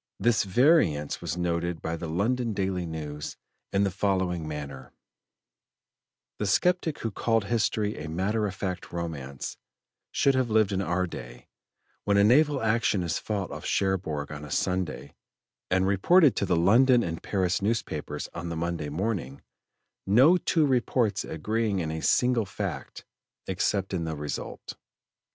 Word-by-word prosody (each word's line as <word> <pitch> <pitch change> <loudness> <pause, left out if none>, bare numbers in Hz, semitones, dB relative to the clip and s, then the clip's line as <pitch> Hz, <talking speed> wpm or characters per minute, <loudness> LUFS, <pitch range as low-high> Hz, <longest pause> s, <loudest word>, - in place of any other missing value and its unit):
This 120 -3 +2
variance 100 - +3
was - - -3
noted 85 -1 -1
by 80 - -3
the 85 -1 -6
London 115 +7 0
Daily 95 -3 -1
News 75 -2 -6 0.3
in 100 +1 +2
the 100 - +1
following 95 -4 0
manner: 70 -3 -7 1.5
"The 105 - -1
sceptic 170 - +2
who 115 - -2
called 115 +2 +1
history 105 -1 0
a 75 - -6
matter 105 +6 0
of 95 - -6
fact 95 -2 -4
romance, 75 -6 -5 0.5
should 140 - +3
have 130 -2 +1
lived 110 -2 +3
in 95 -1 0
our 90 0 0
day, - - -9 0.5
when 100 0 +2
a 100 - +6
naval 140 +4 +4
action 110 -4 +2
is 85 -1 -1
fought 100 -4 -3
off - - -7
Cherbourg 90 -7 -1
on 75 0 -7
a 75 - -8
Sunday, 90 -2 -2 0.6
and 95 0 +2
reported 125 - +5
to 100 - 0
the 90 - +2
London 120 +8 +5
and 80 -1 -4
Paris 95 -1 0
newspapers 80 -9 -2
on 85 0 -5
the 85 - -4
Monday 85 -3 -2
morning, 85 - -3 0.6
no 130 - +6
two 165 -3 +2
reports 120 -6 +1
agreeing 105 +5 -1
in 80 -4 -2
any 80 0 -4
single 125 0 +2
fact, - - -5 0.4
except 95 +1 -1
in 85 -3 -1
the 80 -1 -3
result. 75 0 -5
95 Hz, 150 wpm, -27 LUFS, 85-110 Hz, 1.5 s, a